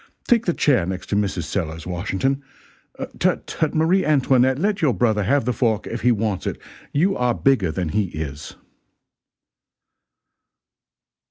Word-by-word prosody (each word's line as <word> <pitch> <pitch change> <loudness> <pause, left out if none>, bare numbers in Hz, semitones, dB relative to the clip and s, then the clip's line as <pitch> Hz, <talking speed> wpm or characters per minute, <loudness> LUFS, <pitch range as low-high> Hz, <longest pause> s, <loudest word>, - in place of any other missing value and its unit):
Take 235 -3 +3
the 175 - +3
chair 130 - +3
next 95 0 -5
to - - +2
Mrs. 100 -4 0
Sellers, 80 -2 -4
Washington 95 +10 -1 0.8
tut, - - +1
tut, 155 0 -2
Marie 165 +5 +3
Antoinette, 130 -3 +3
let 200 +4 0
your 140 -8 +2
brother 110 0 +2
have 140 +1 +2
the 125 - 0
fork 110 -2 0
if - - -5
he 125 - +4
wants 105 -3 -1
it, - - -3 0.3
you 185 +7 +2
are 125 -1 +1
bigger 120 -11 +2
than 90 -1 -2
he 105 +6 +1
is." 75 -4 -6
120 Hz, 150 wpm, -22 LUFS, 95-145 Hz, 0.8 s, he